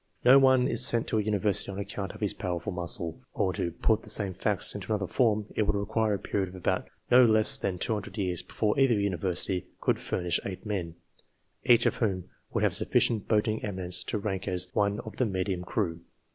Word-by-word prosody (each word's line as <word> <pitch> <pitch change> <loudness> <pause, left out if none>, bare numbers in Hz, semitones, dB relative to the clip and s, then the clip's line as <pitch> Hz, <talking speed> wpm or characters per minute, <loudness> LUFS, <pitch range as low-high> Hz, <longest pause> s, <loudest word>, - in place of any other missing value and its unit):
No 130 +2 +8
one 130 -2 +4
is - - +2
sent 120 -3 +3
to 110 - +1
a - - +2
University 105 -1 0
on 95 - -7
account 100 -1 -5
of - - -13
his 105 - 0
powerful 90 -4 -4
muscle. 85 +2 -3 0.2
Or, 95 -3 0
to 85 - -2
put 105 +6 +1
the - - -10
same 100 -3 +4
facts 95 +1 0
into 100 0 -6
another 105 -2 0
form: 110 0 +1
it 105 - +1
would 105 - +1
require 105 +1 0
a - - -2
period 95 -2 -3
of 90 - -1 0.3
no 125 +1 +8
less 110 -2 +4
than 95 - -2
100 105 +4 -3
years, 90 -4 -1
before 105 +4 -1
either 135 -4 +4
University 95 -1 -1
could - - 0
furnish 90 -2 -1
eight 95 +3 -7
men, 90 -6 -3 0.7
each 120 -2 +5
of - - +1
whom 95 -6 -2 0.2
would - - -1
have - - +2
sufficient 110 -4 +1
boating 110 0 +1
eminence 90 -3 -2
to - - -2
rank 100 -2 -3
as 90 0 -2
one 100 -1 +1
of 110 - -10
the 130 - +2
medium 95 -2 -2
crew. 85 -3 -2
100 Hz, 205 wpm, -28 LUFS, 90-110 Hz, 0.7 s, No